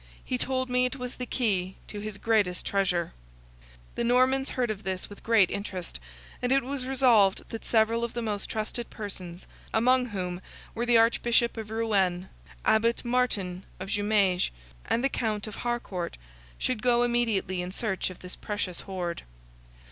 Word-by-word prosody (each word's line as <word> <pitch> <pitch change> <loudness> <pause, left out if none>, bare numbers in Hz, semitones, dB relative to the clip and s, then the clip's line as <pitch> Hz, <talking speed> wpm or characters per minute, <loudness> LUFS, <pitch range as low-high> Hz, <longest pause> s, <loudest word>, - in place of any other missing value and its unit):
He 125 - -1
told 260 -1 0
me 250 0 +3
it 250 +1 -1
was 250 -2 -6
the 250 - -4
key 190 -8 0
to 210 - -6
his 210 -1 -5
greatest 205 -6 +1
treasure." 180 -4 0 0.8
The - - -2
Normans 255 +3 +3
heard 245 -3 0
this 190 +1 -3
with 205 - -10
great 225 -5 +4
interest, 185 - -4 0.4
and 245 - 0
it 270 0 +4
was 260 0 -4
resolved 240 -7 +4
that 225 - -6
several 230 +1 +3
of 235 - -2
the 240 - -3
most 210 -3 -3
trusted 220 +2 -3
persons, 185 -4 -7 0.3
among 250 +3 +3
whom 180 -4 -3 0.3
were 235 +1 -2
the 240 -1 +6
Archbishop 235 +1 +3
of 220 -2 -6
Rouen, 195 -5 +1 0.4
Abbot 230 +3 +3
Martin 205 -7 0 0.2
of - - -6
Jumieges, 205 -3 +2 0.4
and 235 - +1
the - - +5
Count 220 -6 -1
of 215 - -7
Harcourt, 235 -8 -3 0.4
should 250 -4 -1
go 240 0 +4
immediately 225 -6 +1
in 180 +1 -4
search 195 -2 -1
of 185 - -9
this 180 0 -7
precious 205 -4 -3
hoard. 180 -3 -4
220 Hz, 165 wpm, -28 LUFS, 190-240 Hz, 0.8 s, the